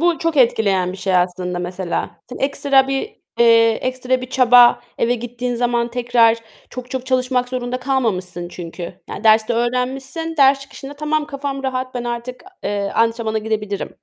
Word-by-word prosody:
bu 345 -1 +2
çok 330 -2 -1
etkileyen 200 -7 +2
bir - - -8
şey 190 -1 0
aslında, 180 0 -1
mesela. 180 0 -3 0.2
Seni 250 - -8
ekstra 275 -1 +2
bir 270 +11 -4 0.2
eee, 230 -1 +6
ekstra 255 +2 -1
bir 255 0 -8
çaba 245 -2 +6 0.2
eve 240 +1 +2
gittiğin 245 +1 -4
zaman 240 0 0
tekrar 235 -1 +3 0.3
çok 250 0 -8
çok 260 -1 -4
çalışmak 255 -1 0
zorunda 250 0 -3
kalmamışsın 185 -10 -1
çünkü, 175 0 -8
yani, 210 - -7
derste 220 +1 +4
öğrenmişsin, 265 +7 -2
ders 275 -1 +5
çıkışında, 275 +1 -10
"Tamam, 300 +1 -1
kafam 275 -1 -5
rahat, 255 -1 -3
ben 245 -1 -3
artık, 240 +1 -5 0.2
eee, 200 -1 -2
antrenmana 225 -1 +1
gidebilirim." 210 -2 -3
245 Hz, 160 wpm, -19 LUFS, 220-265 Hz, 0.3 s, eee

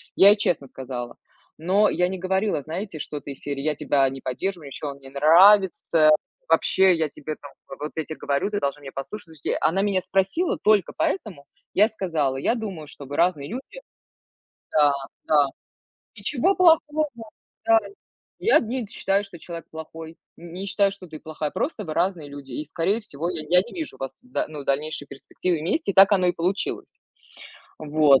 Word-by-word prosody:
Я 195 - +8
ей 205 - +7
честно 160 -8 0
сказала. 125 -2 -6 0.4
Но 190 +6 +3
я 180 0 +1
не 190 - -4
говорила, 190 -1 0
знаете, 165 +3 -6
что-то 145 0 -6
из 135 - -10
серии: 140 -1 -4
"Я 150 +1 0
тебя 135 -2 +2
не 135 0 -8
поддерживаю, 165 +5 -3
ещё 140 +2 -6
он 140 0 -9
не 135 -1 -13
нравится. 165 +2 +5 0.4
Вообще 190 -1 +4
я 160 -1 0
тебе 155 +2 -6
там, 145 - -11 0.3
вот 150 +1 -4
я 160 - -1
те 155 - -6
говорю, 140 +6 -1
ты 205 -1 -1
должна 140 -1 -2
меня 135 -1 -9
послушать". 175 +10 -6
Слушайте, 140 - -1
она 165 +5 +2
меня 200 -2 +1
спросила 195 - 0
только 210 -4 +3
поэтому. 185 -6 -2 0.3
Я 205 - +6
ей - - -2
сказала: 165 - -1
"Я 185 - +1
думаю, 195 -10 -6
что 140 - -9
вы 140 +2 -6
разные 165 -4 +1
люди". 265 - -7 0.9
Да, 150 -2 +5 0.3
да. 145 -2 +4 0.7
Ничего 305 +6 +1
плохого. 310 -4 +4 0.6
Да. 225 0 +6 0.6
Я 455 - +5
не 250 +3 -3
д 205 - -11
считаю, 195 +1 0
что 195 -4 -11
человек 170 0 -8
плохой, 160 +1 -9 0.2
не 175 +3 -7
считаю, 200 0 +2
что 195 -1 -10
ты 155 -2 -9
плохая, 155 -1 -4
просто 275 -8 -2
вы 155 - -4
разные 170 -3 0
люди, 140 -1 -10
и 150 +5 -4
скорее 175 +8 0
всего 170 -4 -4
я, 170 -3 -3
я 180 +1 +6
не 235 - -10
вижу 320 -3 -5
вас, 135 -1 -6
да 250 0 -2
ну, 150 -2 -7
в - - -12
дальнейшие 145 +1 -2
перспективы 170 +5 -3
вместе, 200 - -1
так 195 +2 +7
оно 190 -3 +4
и - - +4
получилось. 180 +4 -2 0.9
Вот. 150 -3 +4
170 Hz, 185 wpm, -24 LUFS, 145-200 Hz, 0.9 s, Я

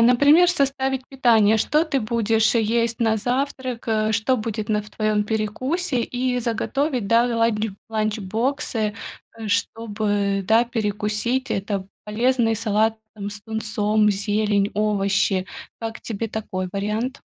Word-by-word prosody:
например, 285 +9 +6
составить 270 -5 0
питание. 225 -5 +4
Что 300 +8 +2
ты 285 -4 -1
будешь 225 0 +1
есть 230 +1 +1
на 225 -1 +2
завтрак, 255 +1 -2
э, 220 0 +1
что 230 +4 +1
будет 215 -1 -4
на 210 -1 +1
в 210 - -15
твоём 215 -1 0
перекусе 245 - -1
и 250 +1 -1
заготовить, 245 +1 -1
да, 230 +1 +5
ланч 225 -1 +1 0.2
ланч-боксы, 220 +2 -1 0.4
э, 220 -2 -6
чтобы, 205 -2 -1
да, 225 +2 +4
перекусить. 220 +3 -1
Это 195 -1 -2 0.2
полезный 230 +1 +1
салат 220 0 +1 0.2
там 205 -1 -5
с 205 0 -8
тунцом, 215 -1 +1
зелень, 205 0 +1
овощи. 200 -2 +1 0.3
Как 225 0 -5
тебе 225 0 -4
такой 185 -4 -4
вариант? 215 +7 -2
220 Hz, 130 wpm, -22 LUFS, 210-245 Hz, 0.4 s, например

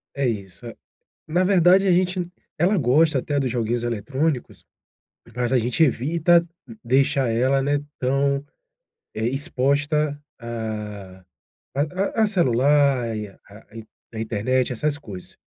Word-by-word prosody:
É 140 -2 0
isso, 100 -2 -5
é 115 - -9 0.5
Na 175 +4 +1
verdade, 185 +1 +4
a - - +4
gente 180 0 0 0.3
ela 185 +5 +2
gosta 150 +2 +3
até 145 +2 -1
dos 130 -2 -1
joguinhos 120 0 -1
eletrônicos, 130 +5 -2 0.7
mas 125 0 -1
a 130 - +4
gente 120 +7 0
evita 165 +6 +2 0.4
deixar 130 +1 +2
ela, 130 +4 +2
né, 145 +1 +1 0.2
tão, 140 +2 0 0.7
eh, 110 +1 -1
exposta 145 +2 0 0.2
a 105 -5 -6 0.5
a 140 - +1 0.4
a - - +5
a 215 - +3
celular 140 - +2
e 105 -1 -4
a 100 +2 -18
in 110 - -9 0.3
a 110 - -6
internet, 120 +4 0
essas 145 +4 -1
coisas. 100 - -10
130 Hz, 135 wpm, -23 LUFS, 115-150 Hz, 0.7 s, a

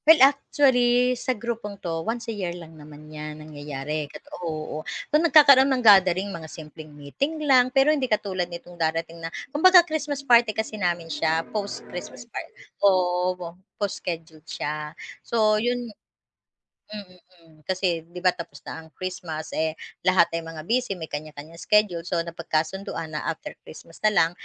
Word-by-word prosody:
Well 320 0 +9
actually 255 -3 +4
sa 250 0 -2
grupong 215 -2 -5
to 165 -1 -2
once 225 +5 -3
a 230 - -4
year 180 -4 -4
lang 165 -2 -11
naman 155 0 -13
yan 150 0 -7
nangyayari 150 -1 -5
kat - - -12 0.2
oo 155 -2 -4 0.3
tuwing 325 +3 +4
nagkakaroon 280 -4 +8
ng 255 -3 0
gathering 190 -1 +5
mga 160 -2 -8
simpleng 155 0 -10
meeting 150 - -4
lang 255 -3 +5
pero 270 +3 +4
hindi 270 -4 -1
katulad 190 -4 -1
nitong 175 0 -10
darating 165 +1 -2
na 165 - -4 0.2
kumbaga 355 +3 +7
Christmas 295 -3 -3
party 235 -4 +4
kasi 220 0 -2
namin 175 -2 0
siya 160 +1 0
post-Christmas 205 -2 -6
par - - -3 0.4
oo, 180 -2 +2
wo 175 -1 -6 0.3
post-scheduled 165 -6 -5
siya. 150 +1 -4 0.2
So 215 -2 +2
yun, 245 -1 -2 1.0
i 215 - -5
mm, 185 -2 -14 0.3
mm, 160 - -21
kasi 180 -1 -1
'di 175 +2 -10
'ba 180 0 +2
tapos 170 - -9
na 160 - -7
ang 160 - -18
Christmas 180 -2 -6
eh, 160 0 -1 0.2
lahat 185 -2 +5
ay 165 - -3
mga 165 -1 -9
busy 250 -1 +1
may 160 - -5
kanya-kanyang 155 +1 -8
schedule, 190 -1 +2
so 175 0 -1
napagkasunduan 165 0 -3
na - - -3
after 160 - -8
Christmas 165 +3 -14
na 215 - +5
lang 165 -5 +3
180 Hz, 165 wpm, -25 LUFS, 160-230 Hz, 1.0 s, Well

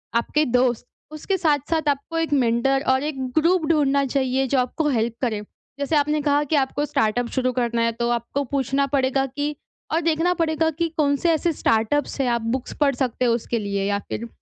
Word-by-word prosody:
आपके 295 +6 +1
दोस्त 245 -1 +1 0.3
उसके 375 +5 -2
साथ-साथ 310 -1 0
आपको 285 +4 -2
एक 325 -3 -1
मेंटर 270 +2 +2
और 260 +1 +3
एक 300 -2 -3 0.2
ग्रुप 335 +1 +3
ढूँढ़ना 280 -3 +2
चाहिए, 265 0 0
जो 265 0 +1
आपको 295 +5 -1
हेल्प 235 -3 0
करे। 220 -4 -1 0.4
जैसे 285 +2 0
आपने 300 +1 +2
कहा 290 0 +2
कि 295 +2 -1
आपको 285 +1 0
स्टार्टअप 235 -1 0
शुरू 255 -1 0
करना 235 -1 0
है, 230 0 +2
तो 235 +1 -2
आपको 240 +4 -1
पूछना 275 +1 0
पड़ेगा 270 -1 +1
कि, 290 +3 -3 0.4
और 325 - +1
देखना 330 +2 +1
पड़ेगा 320 -1 +1
कि 335 +2 -1
कौन-से 290 +3 +2
ऐसे 330 +2 +1
स्टार्टअप्स 250 +4 0
हैं, 260 - 0
आप 235 -1 0
बुक्स 240 +3 -3
पढ़ 280 -3 +3
सकते 250 -1 -1
हो 235 - +3
उसके 235 0 -2
लिए 200 -1 -2
या 200 0 0
फ़िर 235 - -4
270 Hz, 195 wpm, -23 LUFS, 240-300 Hz, 0.4 s, और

